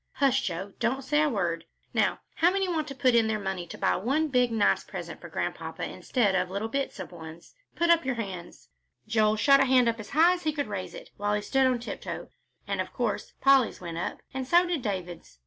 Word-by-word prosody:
Hush, 270 Hz, -2 st, +2 dB
Joe, 190 Hz, +3 st, -4 dB
don't 265 Hz, +3 st, 0 dB
say 295 Hz, +3 st, +2 dB
a 305 Hz, -, +3 dB
word. 170 Hz, -, -1 dB, 0.3 s
Now -, -, +1 dB, 0.2 s
how 340 Hz, -, +5 dB
many 385 Hz, +1 st, 0 dB
want 320 Hz, -4 st, -1 dB
to 275 Hz, -, -7 dB
put 255 Hz, -1 st, +3 dB
in 230 Hz, -1 st, +4 dB
their 220 Hz, -1 st, 0 dB
money 190 Hz, -3 st, -4 dB
to -, -, -9 dB
buy -, -, +2 dB
one 275 Hz, -, 0 dB
big, 250 Hz, -3 st, +2 dB
nice 220 Hz, -3 st, +2 dB
present -, -, -8 dB
for -, -, -9 dB
Grandpapa -, -, -4 dB
instead 225 Hz, -7 st, 0 dB
of 180 Hz, -1 st, +1 dB
little 200 Hz, +4 st, -3 dB
bits 275 Hz, -3 st, -3 dB
of 185 Hz, -, -7 dB
ones? 165 Hz, -1 st, -11 dB, 0.2 s
Put 340 Hz, 0 st, +3 dB
up 335 Hz, -1 st, +4 dB
your 265 Hz, -1 st, -1 dB
hands." 190 Hz, -6 st, -7 dB, 0.4 s
Joel's 215 Hz, -1 st, +2 dB
hand 275 Hz, -1 st, +7 dB
shot 255 Hz, -2 st, +5 dB
up 230 Hz, 0 st, 0 dB
as 215 Hz, -, -8 dB
high 330 Hz, +5 st, +5 dB
as 360 Hz, -, -4 dB
he 310 Hz, -2 st, -1 dB
could 290 Hz, -1 st, -1 dB
raise 195 Hz, -3 st, -5 dB
it, -, -, -11 dB
while 205 Hz, +1 st, 0 dB
he 210 Hz, -, -1 dB
stood 270 Hz, +3 st, +3 dB
on 255 Hz, -1 st, +2 dB
tiptoe, 240 Hz, -, -6 dB, 0.4 s
and -, -, -1 dB
of -, -, -6 dB
course -, -, -2 dB
Polly's 270 Hz, -3 st, +4 dB
went 170 Hz, -2 st, -6 dB
up, -, -, -4 dB
and 265 Hz, -1 st, -4 dB
so 345 Hz, +4 st, +5 dB
did 345 Hz, -5 st, -1 dB
David's. 180 Hz, -, -5 dB
235 Hz, 230 wpm, -28 LUFS, 195-275 Hz, 0.4 s, hand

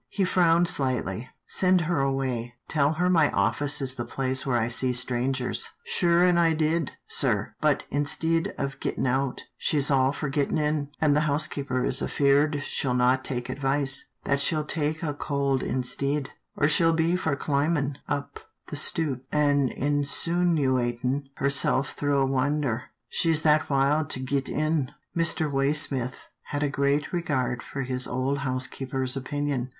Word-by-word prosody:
He 195 Hz, -, 0 dB
frowned 175 Hz, -1 st, +3 dB
slightly. 125 Hz, -, -1 dB
" -, -, -54 dB
Send 185 Hz, -1 st, +2 dB
her 165 Hz, -2 st, 0 dB
away. 130 Hz, -3 st, -2 dB
Tell 145 Hz, -1 st, +2 dB
her 175 Hz, +3 st, 0 dB
my 165 Hz, -5 st, +4 dB
office 145 Hz, 0 st, 0 dB
is 130 Hz, -1 st, +1 dB
the 125 Hz, -2 st, -4 dB
place 130 Hz, +1 st, 0 dB
where 125 Hz, -2 st, +2 dB
I 115 Hz, -1 st, 0 dB
see 125 Hz, +1 st, +1 dB
strangers." 125 Hz, +1 st, 0 dB
" 470 Hz, -, -43 dB
Sure 175 Hz, -1 st, +4 dB
an' 175 Hz, -1 st, +3 dB
I 165 Hz, -1 st, +4 dB
did, 160 Hz, -1 st, 0 dB
sir; -, -, 0 dB
but, -, -, +2 dB
instid 160 Hz, +3 st, 0 dB
of 135 Hz, 0 st, -4 dB
gittin' -, -, -2 dB
out, 130 Hz, +1 st, -1 dB
she's 145 Hz, -2 st, 0 dB
all 135 Hz, -1 st, +3 dB
for 150 Hz, +1 st, -4 dB
gittin' 140 Hz, +2 st, 0 dB
in, 150 Hz, -1 st, 0 dB
an' 150 Hz, -2 st, +3 dB
the 150 Hz, +1 st, +2 dB
housekeeper 140 Hz, -3 st, -1 dB
is 130 Hz, -, 0 dB
afeard 145 Hz, +1 st, +2 dB
she'll 125 Hz, -2 st, -1 dB
not 125 Hz, +1 st, +2 dB
take 125 Hz, -2 st, -3 dB
advice, 135 Hz, 0 st, 0 dB, 0.2 s
that 140 Hz, -, +1 dB
she'll 155 Hz, +2 st, 0 dB
take 155 Hz, +1 st, -1 dB
a 150 Hz, -3 st, -1 dB
cold 140 Hz, -2 st, -1 dB
instid, 135 Hz, +2 st, -1 dB, 0.3 s
or 145 Hz, -, +3 dB
she'll 165 Hz, +2 st, +3 dB
be 165 Hz, +2 st, +1 dB
for 160 Hz, -5 st, -1 dB
climbin' 145 Hz, 0 st, -1 dB
up 140 Hz, 0 st, -4 dB, 0.3 s
the -, -, -5 dB
stoop 140 Hz, -6 st, 0 dB
an' 145 Hz, -3 st, +2 dB
insinoo 145 Hz, 0 st, +1 dB
atin' 125 Hz, +3 st, -2 dB
herself 140 Hz, -1 st, +1 dB
through 145 Hz, -1 st, -1 dB
a 135 Hz, -, +3 dB
winder, 135 Hz, -2 st, 0 dB, 0.2 s
she's 160 Hz, -2 st, +1 dB
that 155 Hz, 0 st, +3 dB
wild 145 Hz, +2 st, +2 dB
to 130 Hz, -, +1 dB
git 135 Hz, +1 st, -2 dB
in." 155 Hz, -3 st, 0 dB, 0.3 s
Mr. 165 Hz, -1 st, +2 dB
Waysmith 135 Hz, -2 st, 0 dB, 0.2 s
had 145 Hz, 0 st, -3 dB
a 145 Hz, -, +1 dB
great 140 Hz, +3 st, 0 dB
regard 130 Hz, -8 st, -1 dB
for 135 Hz, -, -5 dB
his 125 Hz, 0 st, 0 dB
old 135 Hz, +2 st, -1 dB
housekeeper's 130 Hz, 0 st, -1 dB
opinion. 135 Hz, -1 st, -2 dB
140 Hz, 165 wpm, -26 LUFS, 130-155 Hz, 0.3 s, my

